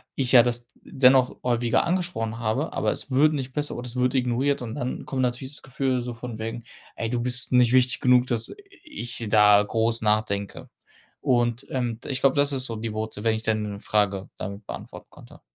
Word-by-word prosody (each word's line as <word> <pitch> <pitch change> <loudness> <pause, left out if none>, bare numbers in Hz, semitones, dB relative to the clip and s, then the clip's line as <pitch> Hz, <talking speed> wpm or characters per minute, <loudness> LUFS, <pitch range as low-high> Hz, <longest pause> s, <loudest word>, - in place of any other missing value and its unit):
ich 130 -3 -1
ja 125 -2 +9
das 120 -1 -1
d - - -32
dennoch 130 -1 +3
häufiger 120 -1 +1
angesprochen 170 -11 -2
habe, 120 +7 -2
aber - - 0
es 140 - -6
wird 150 +4 +4
nicht 130 -3 -4
besser, 150 0 -2
oder 120 +1 -6
es 120 - -6
wird 125 +1 +1
ignoriert 130 +2 0
und 115 -1 -6
dann 125 -3 -4
kommt 130 - -2
natürlich 125 +2 -2
das 150 - -6
Gefühl, 130 -1 -1
so 120 0 -5
von 115 -1 -8
wegen: 115 +2 -5 0.3
„Ey, 115 - -3
du 120 - -1
bist 125 +1 +2
nicht 125 -1 +4
wichtig 130 -1 +3
genug, 125 -1 +4
dass 115 - -1 0.3
ich 120 - -5
da 105 -1 +6
groß 115 +2 0
nachdenke.“ 105 -2 -1 0.5
Und, 120 +1 0
ähm, 120 -3 -2
d - - -9
ich 130 -2 -2
glaube, 135 0 +3
das 145 0 +3
ist 130 -1 +1
so 115 - -4
die 110 0 -4
Wurzel, 110 -1 -5
wenn 110 -1 +2
ich 110 - -5
deine 105 -2 -2
Frage 100 -3 0
damit 100 +2 -7
beantworten - - -9
konnte. - - -16
120 Hz, 210 wpm, -25 LUFS, 110-130 Hz, 0.5 s, ja